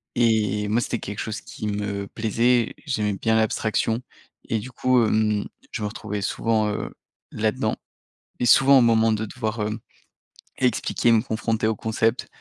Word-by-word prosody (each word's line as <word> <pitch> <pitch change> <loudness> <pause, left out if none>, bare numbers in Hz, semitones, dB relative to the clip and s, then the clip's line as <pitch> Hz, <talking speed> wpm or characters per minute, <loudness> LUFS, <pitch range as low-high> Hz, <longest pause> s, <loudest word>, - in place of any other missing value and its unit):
et 110 -3 +2
moi, 115 +3 +2
c'était 120 - -2
quelque 100 0 -6
chose 110 0 -4
qui 105 - -7
me 100 -1 -3
plaisait, 115 +2 +1
j'aimais 105 -6 0
bien 110 +3 0
l'abstraction 110 +1 0 0.5
et 115 - +1
du 125 +4 -6
coup, 125 0 +2
hem, 105 -1 +1 0.2
je - - -5
me 105 - 0
retrouvais 105 -1 -5
souvent, 110 +2 0
heu, 105 - -3 0.4
là-dedans - - 0 0.6
et 125 - +1
souvent 135 +3 +7
au - - +6
moment 115 -1 +4
de 110 0 -1
devoir, 110 -1 -4
hem, 105 +1 -2 0.8
expliquer, 120 -1 +2
me 110 -1 +4
confronter 110 -1 -1
au 110 - 0
concept 110 +3 0
110 Hz, 160 wpm, -24 LUFS, 105-115 Hz, 0.8 s, souvent